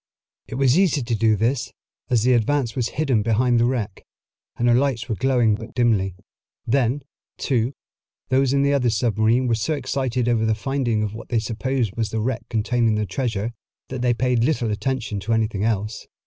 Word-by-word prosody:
It - - -6
was 135 +4 +3
easy 160 -8 +2
to 120 0 -2
do 110 -1 +3
this, 120 +5 0 0.4
as 120 -4 +2
the 125 +1 +4
Advance 120 0 +1
was 125 -3 0
hidden 135 -8 +2
behind 120 +2 +2
the 115 - +3
wreck, 115 -6 -3 0.5
and 120 - +1
her 120 - +5
lights 125 -2 +1
were 115 - -1
glowing 120 -2 +2
but 110 +2 -7
dimly. 105 -7 +2 0.5
Then, 130 +2 +1 0.3
too, 125 -1 0 0.5
those 130 +1 +3
in 140 0 +2
the 140 0 +2
other 125 -4 +2
submarine 110 +2 +2
were 120 - +1
so 115 +8 0
excited 130 -3 -1
over 115 -2 +2
the 110 -1 +2
finding 120 -2 -1
of 105 -1 -3
what 115 - -9
they 120 - +1
supposed 115 0 -1
was 115 -2 -1
the 110 - -2
wreck 115 +2 -3
containing 115 0 +1
the 105 0 0
treasure, 115 -2 -2 0.4
that 130 -1 -4
they 125 -1 +2
paid 125 -1 +1
little 125 -5 +1
attention 115 -2 -2
to 105 +4 -1
anything 110 -3 0
else. 105 -1 -2
120 Hz, 190 wpm, -22 LUFS, 110-130 Hz, 0.5 s, her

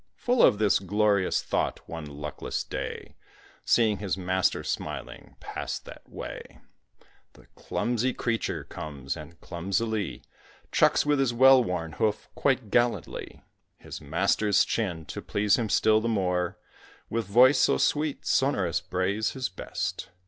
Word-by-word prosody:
Full 245 -1 +1
of 105 - +6
this 105 -1 +3
glorious 100 0 +1
thought, - - -2
one 80 -2 -6
luckless 75 0 -5
day, - - -6 0.5
Seeing 110 -4 +3
his 95 -2 -2
master 95 0 0
smiling - - -5
pass - - -5
that - - -13
way, - - -8 0.8
The - - -19
clumsy 120 +1 -1
creature 115 -2 -2
comes, 70 -3 -6
and 80 +1 -11
clumsily 100 - -2 0.5
Chucks - - +3
with 145 -1 +2
his 125 -3 +1
well 130 +1 +7
worn 85 -5 -3
hoof 105 +6 -1
quite 130 -7 0
gallantly 120 0 -1 0.3
His - - -9
master's 95 +7 +2
chin; 90 -8 -2
to - - -6
please 100 +1 +1
him 110 -3 -1
still 110 +2 +4
the 115 - -1
more, 90 -4 0 0.5
With 115 -3 -2
voice, 125 +7 +6
so - - +4
sweet, 150 -1 0
sonorous 100 - +1
brays 95 +4 -1
his 130 -2 -3
best. 95 - -5
105 Hz, 135 wpm, -27 LUFS, 90-120 Hz, 0.8 s, well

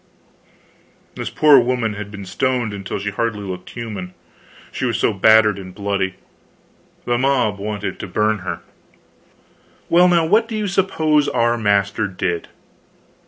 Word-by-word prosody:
This - - -5
poor 150 -3 +6
woman 120 -3 0
had 105 0 -7
been 100 -1 -9
stoned 120 +3 -1
until 100 -1 -5
she 100 +1 -3
hardly 105 0 -2
looked 90 -2 -7
human, 105 -6 -7 0.6
she - - -5
was - - 0
so - - +1
battered 105 0 +4
and 95 -1 -10
bloody. 100 -2 -2 0.9
The 120 0 0
mob 125 -6 +1
wanted 105 0 -4
to - - -5
burn 110 0 0
her. 90 - -5 1.3
Well, 175 +2 +6
now, 170 -2 +3
what 220 +7 +3
do 225 -1 -4
you 210 -1 -1
suppose 160 -6 +1
our 120 0 +1
master 100 -1 +1
did? 90 -3 -3
110 Hz, 145 wpm, -20 LUFS, 100-130 Hz, 1.3 s, poor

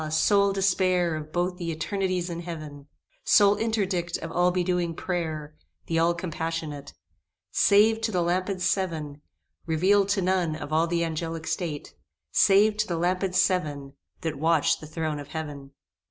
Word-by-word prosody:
sole 200 +5 +3
despair 185 -3 +1
Of 155 0 -7
both 180 +1 -1
the 170 -2 -4
eternities 185 +1 -2
in 170 - -4
Heaven! 155 -4 -8 0.4
Sole 205 -1 +5
interdict 195 -6 -1
of 165 - -7
all 175 +1 +3
bedewing 180 -2 0
prayer, 160 -5 -3 0.3
The 165 0 0
all 170 +1 +3
compassionate! 160 -4 -5 0.6
Save 220 +2 +4
to 225 0 -1
the 180 -3 +1
Lampads 185 +2 -1
Seven 165 -7 -2 0.5
Reveal'd 195 +5 +3
to 200 -1 +1
none 180 -3 +1
of 155 -1 -6
all 160 +2 +3
the 170 0 0
Angelic 165 0 -4
State, 160 -2 -4 0.4
Save 210 +1 +4
to 215 - 0
the 170 - -2
Lampads 180 +2 0
Seven, 145 -8 0 0.3
That 160 -5 -3
watch 160 0 +2
the 155 - -10
throne 155 -1 -3
of 145 - -8
Heaven! 145 -3 -6
170 Hz, 155 wpm, -26 LUFS, 160-185 Hz, 0.6 s, Sole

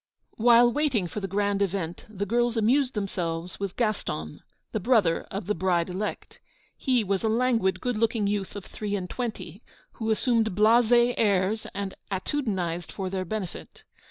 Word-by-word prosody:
While 240 +1 +6
waiting 275 -10 +1
for 175 +5 -5
the 195 - -3
grand 200 +1 0
event, 185 -3 -2
the 205 -1 -3
girls 240 +2 +1
amused 250 +4 +2
themselves 180 -4 -3
with 200 -2 -3
Gaston, 140 - -2 0.3
the 220 - -1
brother 205 -6 +2
of 195 -1 -4
the 210 - 0
bride 175 -1 0
elect. 200 +4 -5 0.4
He 250 -4 +1
was 195 0 -1
a 220 - +2
languid, 230 -4 +2
good 245 -3 -2
looking 225 -2 +1
youth 200 -1 -2
of 205 - -7
three 205 -1 -4
and 185 -2 -3
twenty, 225 -2 -5 0.3
who 220 -1 -4
assumed 225 -2 +1
blasé 240 +3 +5
airs 205 0 +1
and 200 -1 -3 0.2
attitudinized 185 - -2
for 190 -2 -4
their 190 -1 -2
benefit. 190 -1 -6
205 Hz, 160 wpm, -27 LUFS, 190-230 Hz, 0.4 s, While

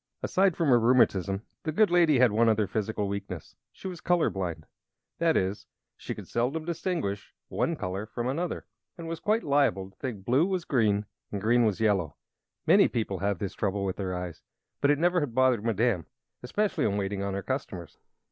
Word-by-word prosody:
Aside 190 -2 +2
from 165 -4 +1
her 120 -2 +6
rheumatism 105 -5 +3 0.2
the 155 - -2
good 205 +4 +3
lady 170 -5 +5
had 125 -2 +5
one 115 +2 +3
other 110 -1 +2
physical 105 0 -2
weakness; 100 -4 -6 0.2
she - - -9
was 180 -3 -7
color 175 -2 +2
blind. 85 -5 -4 0.5
That 165 -1 +3
is, 95 +2 -2 0.3
she - - -6
could - - -9
seldom 135 +7 -1
distinguish 165 - -3
one - - 0
color 95 +4 -4
from 120 +2 -4
another, 165 +7 -2 0.3
and 165 -1 -7
was 165 0 -4
quite 220 +2 +1
liable 140 -10 +1
to - - -32
think 110 -8 -5
blue 135 +8 +3
was 185 -3 -2
green 105 -5 +2 0.3
and 100 - -3
green 115 +3 +3
was 105 -4 0
yellow. 100 -9 +1 0.5
Many - - +6
people 105 -5 -2
have 100 -1 0
this 100 +1 -4
trouble 100 -1 -1
with 95 - -2
their 95 -2 -3
eyes; 90 -2 -6 0.4
but 140 - +3
it 145 - +4
never 175 +3 +3
had 140 -7 -3
bothered 130 -4 +3
Madame 115 -5 +1 0.3
especially 205 +12 -1
in 100 -1 +1
waiting 100 0 -2
upon 100 0 -2
her 100 - -3
customers. 95 - -5
115 Hz, 195 wpm, -28 LUFS, 100-150 Hz, 0.5 s, her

